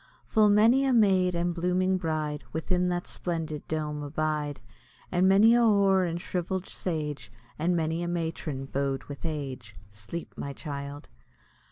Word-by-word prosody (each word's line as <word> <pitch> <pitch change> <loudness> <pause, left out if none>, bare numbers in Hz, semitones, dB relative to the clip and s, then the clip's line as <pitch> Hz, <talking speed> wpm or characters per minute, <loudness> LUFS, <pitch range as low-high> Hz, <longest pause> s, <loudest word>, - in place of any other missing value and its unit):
Full 215 -1 +4
many 225 +6 +5
a 270 -1 +2
maid 190 -5 +4
and 175 +1 0
blooming 180 +2 +1
bride 155 -3 -2
Within 180 +3 0
that 175 0 -2
splendid 165 -4 -4
dome 150 -1 -2
abide, 150 0 -2 0.5
And 185 +1 +4
many 210 +4 +6
a 240 - +5
hoar 200 -4 +4
and 170 0 -2
shrivell'd 180 +1 -3
sage, 150 -5 -4 0.3
And 175 +3 +2
many 160 0 0
a 175 - -2
matron 160 -5 -3
bow'd 135 0 -2
with 145 +3 -8
age. 130 -9 -5 0.2
Sleep, 110 +11 -7
my 140 - -5
child! 140 -1 -6
170 Hz, 150 wpm, -28 LUFS, 150-185 Hz, 0.5 s, many